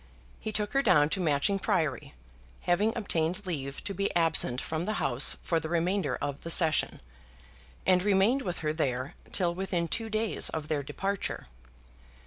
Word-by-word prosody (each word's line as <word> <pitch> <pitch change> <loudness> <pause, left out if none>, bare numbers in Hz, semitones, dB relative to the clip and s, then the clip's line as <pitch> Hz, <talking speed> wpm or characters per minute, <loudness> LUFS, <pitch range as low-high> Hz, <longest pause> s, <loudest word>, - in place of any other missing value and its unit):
He 215 - -3
took 210 -1 -1
her 275 - +3
down 175 - +4
to 190 - -1
Matching 170 +4 +1
Priory, 165 - -1 0.5
having 200 +5 +2
obtained 185 -2 -1
leave 140 -6 -4
to 200 - -4
be 200 +2 0
absent 160 -7 +3
from 160 +4 -3
the 215 - -1
House 120 +3 +3
for 165 -2 +1
the 160 0 -6
remainder 175 +4 0
of 140 0 -4
the 165 - -6
Session, 165 -2 +2 0.8
and 185 -1 +4
remained 205 +7 +3
with 180 -7 -4
her 150 - +1
there 130 -4 -2 0.2
till 175 -3 +1
within 180 -2 -2
two 225 +5 -3
days 220 0 -1
of 155 -2 -5
their 150 -2 0
departure. 195 +8 -3
175 Hz, 165 wpm, -29 LUFS, 155-200 Hz, 0.8 s, down